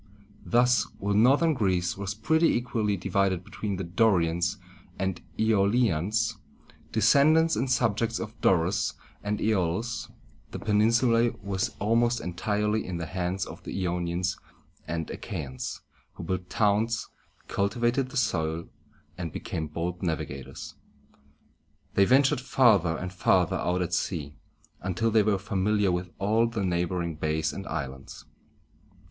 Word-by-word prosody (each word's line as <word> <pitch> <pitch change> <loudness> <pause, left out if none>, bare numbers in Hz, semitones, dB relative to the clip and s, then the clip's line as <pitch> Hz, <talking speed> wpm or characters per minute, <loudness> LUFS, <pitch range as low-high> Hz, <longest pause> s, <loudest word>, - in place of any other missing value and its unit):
Thus, 125 +1 +3
while 100 +1 -1
northern 135 +10 +4
Greece 90 -8 0
was 100 +1 -4
pretty 160 +10 +3
equally 115 -6 0
divided 95 0 0
between 100 +2 -4
the 95 - -4
Do´ri 90 0 +3
ans 85 +3 -1 0.4
and 95 -2 -2 0.2
Æ 110 - +1
o´li 105 +1 +3
ans, 110 +7 -1 0.5
descendants 150 +9 +4
and 130 - -1
subjects 115 -2 +1
of 110 -1 -5
Dorus 90 +1 +2 0.3
and 105 +1 -1
Æolus, 110 +3 -1 0.4
the - - -6
peninsula 115 +2 +3
was 95 -1 -2
almost 120 +3 +2
entirely 105 +4 -1
in 90 -2 -4
the 85 - -4
hands 90 +3 -2
of - - -10
the - - -7
I 85 - 0
o´ni 85 -1 -2
ans 90 +1 -1 0.5
and 80 0 -3
A - - -5
chæ´ans, 65 -2 -5 0.3
who - - -8
built 90 +1 -3
towns, 110 +2 +1 0.4
cultivated 120 +6 0
the 135 - -5
soil, 80 -8 -1 0.5
and 85 -3 -4
became 80 +2 -4
bold 85 +3 -4
navigators. 80 -6 -4 1.2
They 100 - +5
ventured 130 +2 +4
farther 105 - +3
and 90 +2 -5
farther 95 0 +2
out 90 +2 0
at 90 - -4
sea, 75 -5 -2 0.5
until 95 +5 0
they 110 0 +5
were 105 -1 +2
familiar 100 0 +1
with 90 0 -2
all 110 +4 +2
the 110 -4 -2
neighboring 85 -2 -1
bays 80 0 -1
and 95 0 -7
islands. 70 -4 -6
100 Hz, 140 wpm, -27 LUFS, 90-115 Hz, 1.2 s, They